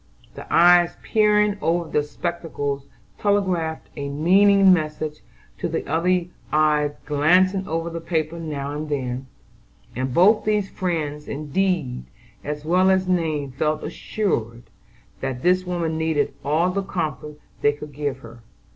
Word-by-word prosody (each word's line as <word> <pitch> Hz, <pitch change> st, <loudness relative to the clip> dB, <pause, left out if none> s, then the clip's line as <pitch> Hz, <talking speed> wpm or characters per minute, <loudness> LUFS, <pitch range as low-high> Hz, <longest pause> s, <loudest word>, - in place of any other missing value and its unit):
The -, -, -10 dB
eyes 175 Hz, 0 st, +5 dB
peering 210 Hz, -2 st, +3 dB
over 170 Hz, 0 st, 0 dB
the 150 Hz, -, +1 dB
spectacles 145 Hz, -3 st, -4 dB, 0.3 s
telegraphed 185 Hz, -6 st, 0 dB
a 140 Hz, -1 st, -4 dB
meaning 190 Hz, +6 st, +5 dB
message 155 Hz, -2 st, -2 dB, 0.4 s
to -, -, -1 dB
the -, -, -3 dB
other 175 Hz, +3 st, +1 dB, 0.3 s
eyes 150 Hz, -1 st, +2 dB
glancing 185 Hz, +6 st, +3 dB
over 165 Hz, +1 st, -2 dB
the 165 Hz, 0 st, -5 dB
paper 165 Hz, 0 st, -2 dB
now 145 Hz, -3 st, -4 dB
and 150 Hz, +1 st, -5 dB
then; 130 Hz, -2 st, -3 dB, 0.7 s
and 130 Hz, +2 st, -2 dB
both 195 Hz, -, +5 dB
these 210 Hz, -2 st, 0 dB
friends 150 Hz, -5 st, -3 dB
in 145 Hz, +1 st, -6 dB
deed 170 Hz, -, 0 dB, 0.4 s
as 150 Hz, 0 st, -5 dB
well 180 Hz, +3 st, +3 dB
as 190 Hz, -1 st, +2 dB
name 155 Hz, -6 st, 0 dB
felt 155 Hz, +4 st, -1 dB
assured 120 Hz, -, -3 dB, 0.6 s
that 130 Hz, -2 st, -4 dB
this 185 Hz, +1 st, +3 dB
woman 165 Hz, -3 st, -2 dB
needed 160 Hz, -2 st, 0 dB
all 160 Hz, +5 st, +1 dB
the 200 Hz, +2 st, -1 dB
comfort 150 Hz, -6 st, -4 dB, 0.2 s
they 145 Hz, -, +4 dB
could 145 Hz, 0 st, -10 dB
give 140 Hz, -2 st, -3 dB
her. 115 Hz, -1 st, -13 dB
160 Hz, 140 wpm, -23 LUFS, 145-180 Hz, 0.7 s, eyes